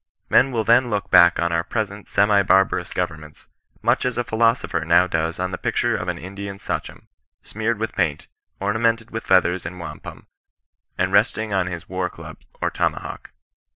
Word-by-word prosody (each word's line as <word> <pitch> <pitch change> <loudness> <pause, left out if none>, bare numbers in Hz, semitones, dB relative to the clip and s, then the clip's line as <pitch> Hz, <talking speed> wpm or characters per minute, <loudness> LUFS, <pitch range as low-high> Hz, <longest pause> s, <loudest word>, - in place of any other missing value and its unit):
Men 135 - +5
will 115 -3 0
then 120 +2 +4
look 105 -3 -3
back 85 -1 +7
on 85 0 +1
our 85 0 +1
present 105 0 -4
semi 100 0 +3
barbarous 95 0 +2
governments, 75 -1 -5 0.3
much - - +2
as 125 -1 -2
a 120 - +1
philosopher 115 -2 +1
now 85 +2 +4
does 80 0 -2
on 90 0 -2
the 90 - -5
picture - - 0
of - - -4
an - - -2
Indian 100 +2 -7
Sachom, - - -5 0.4
smeared 110 +1 -2
with 110 +1 -3
paint, 80 -6 -1 0.3
ornamented 110 +3 0
with 115 0 -4
feathers 90 -1 +3
and 90 +2 -7
wampum, 85 - -9 0.7
and 95 +1 0
resting 105 +1 +2
on 95 -2 +1
his 85 -2 -6
war 95 0 -2
club - - -11 0.2
or - - -1
tomahawk. - - -3
100 Hz, 175 wpm, -22 LUFS, 90-110 Hz, 0.7 s, back